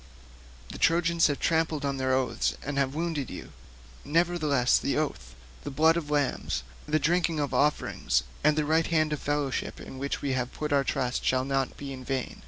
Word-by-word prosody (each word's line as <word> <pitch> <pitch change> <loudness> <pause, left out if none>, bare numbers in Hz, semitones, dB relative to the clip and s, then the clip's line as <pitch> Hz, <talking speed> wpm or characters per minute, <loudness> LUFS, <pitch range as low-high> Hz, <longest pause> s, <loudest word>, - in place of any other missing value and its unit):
The - - -8
Trojans 170 0 +3
have 145 -2 -2
trampled 160 -3 +1
on 140 -1 -1
their 130 0 0
oaths 130 -1 +1
and 140 0 -1
have 135 0 0
wounded 160 -5 -2
you; - - -8 0.5
nevertheless 155 -5 +2
the - - -1
oath, 65 - -3 0.3
the - - -4
blood 160 +4 +4
of 165 -3 -3
lambs, 145 - 0 0.2
the 155 +1 +2
drink 170 +3 +2
offerings 150 -1 +1 0.2
and 150 +1 +4
the 155 - +2
right 160 +2 +2
hands 155 -2 +2
of 150 - -3
fellowship 145 -2 -2
in 130 - -9
which 140 +1 -2
we 140 -2 0
have 125 -1 -1
put 150 -1 -2
our 140 -1 +4
trust 130 -2 -1
shall 130 0 +1
not 135 -1 -1
be 140 -1 -6
vain. 130 0 -3
145 Hz, 185 wpm, -28 LUFS, 135-155 Hz, 0.5 s, blood